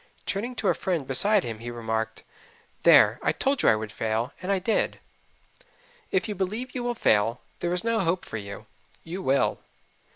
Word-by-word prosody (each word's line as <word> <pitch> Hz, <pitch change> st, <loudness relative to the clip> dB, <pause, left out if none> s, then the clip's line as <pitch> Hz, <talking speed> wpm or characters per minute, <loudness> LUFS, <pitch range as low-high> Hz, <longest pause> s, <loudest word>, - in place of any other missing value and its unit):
Turning 235 Hz, +6 st, -3 dB
to 220 Hz, -3 st, -1 dB
a -, -, +4 dB
friend 170 Hz, -7 st, -2 dB
beside 200 Hz, +10 st, +4 dB
him 115 Hz, -2 st, -5 dB
he 120 Hz, +1 st, -6 dB
remarked, 110 Hz, -1 st, -3 dB, 0.6 s
"There, -, -, +6 dB
I -, -, +2 dB
told 275 Hz, 0 st, 0 dB
you -, -, +5 dB
I -, -, +5 dB
would 110 Hz, -1 st, -5 dB
fail, 110 Hz, +3 st, -2 dB
and 185 Hz, +2 st, -2 dB
I 195 Hz, -, +3 dB
did." 190 Hz, +4 st, 0 dB, 1.1 s
If 190 Hz, +4 st, 0 dB
you 210 Hz, -, -2 dB
believe 210 Hz, +7 st, -3 dB
you 250 Hz, -, -3 dB
will 240 Hz, 0 st, -1 dB
fail, 115 Hz, -, +2 dB, 0.2 s
there 175 Hz, -, -1 dB
is 180 Hz, 0 st, 0 dB
no 230 Hz, -1 st, +1 dB
hope 180 Hz, -1 st, 0 dB
for -, -, -5 dB
you. 100 Hz, -1 st, -8 dB, 0.4 s
You 180 Hz, +4 st, -6 dB
will. 135 Hz, -5 st, +1 dB
180 Hz, 190 wpm, -26 LUFS, -, 1.1 s, There